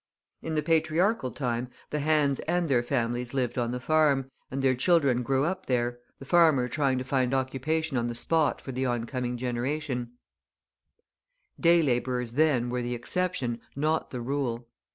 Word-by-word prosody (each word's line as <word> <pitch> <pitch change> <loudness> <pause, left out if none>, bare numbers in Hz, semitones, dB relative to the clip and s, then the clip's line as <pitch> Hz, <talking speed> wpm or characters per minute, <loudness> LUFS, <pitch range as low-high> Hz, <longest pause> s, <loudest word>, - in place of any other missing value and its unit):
In 160 -1 -3
the 150 - +1
patriarchal 165 - +2
time, 125 -2 -3 0.2
the 150 - -1
hands 145 -2 +2
and 175 +1 +1
their 130 -5 +3
families 120 0 -2
lived 125 -1 0
on 120 -1 0
the 125 +1 -3
farm, 140 -2 +2 0.2
and 135 +1 -3
their 130 -1 +4
children 140 -2 +3
grew 135 +3 +1
up 185 +3 -3
there, 120 -1 0 0.2
the 135 - -11
farmer 155 -6 +4
trying 135 0 0
to 130 - -2
find 130 -1 0
occupation 135 +3 -1
on 120 - -1
the 120 - -4
spot 160 +4 +1
for 135 - -6
the 130 +1 -1
oncoming 125 +1 -2
generation; 125 0 -3 1.5
day 170 -1 +5
labourers, 125 -2 0
then, 130 -3 +2
were 125 0 -1
the 120 0 -2
exception, 125 -4 -1
not 155 +3 0
the 125 - -5
rule. 120 -2 -2
130 Hz, 165 wpm, -28 LUFS, 125-155 Hz, 1.5 s, day